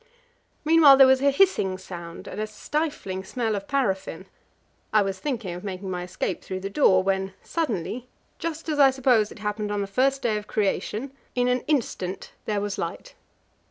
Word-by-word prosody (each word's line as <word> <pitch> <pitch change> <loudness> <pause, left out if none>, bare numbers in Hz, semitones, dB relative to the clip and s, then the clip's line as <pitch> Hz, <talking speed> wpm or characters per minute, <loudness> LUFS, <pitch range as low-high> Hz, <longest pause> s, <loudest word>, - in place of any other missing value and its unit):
Meanwhile 310 -3 +8
there 270 - +9
was 260 0 +4
a 280 - +5
hissing 275 - +2
sound, 175 -3 -9
and 210 - -5
a 215 - -2
stifling 215 -5 -3
smell 225 0 -2
of 200 0 -5
paraffin. 200 -9 -1 0.7
I 215 -1 +4
was 195 -1 -3
thinking 235 -11 -3
of 180 - -8
making 190 -1 -5
my 180 -1 -3
escape 180 +1 -3
through 185 0 -5
the 195 +1 -5
door, 190 -8 +4
when 190 0 -1
suddenly, 245 - -3 0.3
just 330 -1 -4
as 300 -2 -1
I 275 -1 +8
suppose 250 -5 +2
it - - -11
happened 210 0 -3
on 205 -1 -1
the - - -1
first 265 +7 +1
day 220 -3 +1
of 210 - -7
Creation, 215 +5 -1 0.2
in 245 0 +2
an 250 0 +2
instant 210 -10 -2
there 210 -2 -1
was 205 -1 -3
light. - - -5
215 Hz, 185 wpm, -25 LUFS, 190-270 Hz, 0.7 s, there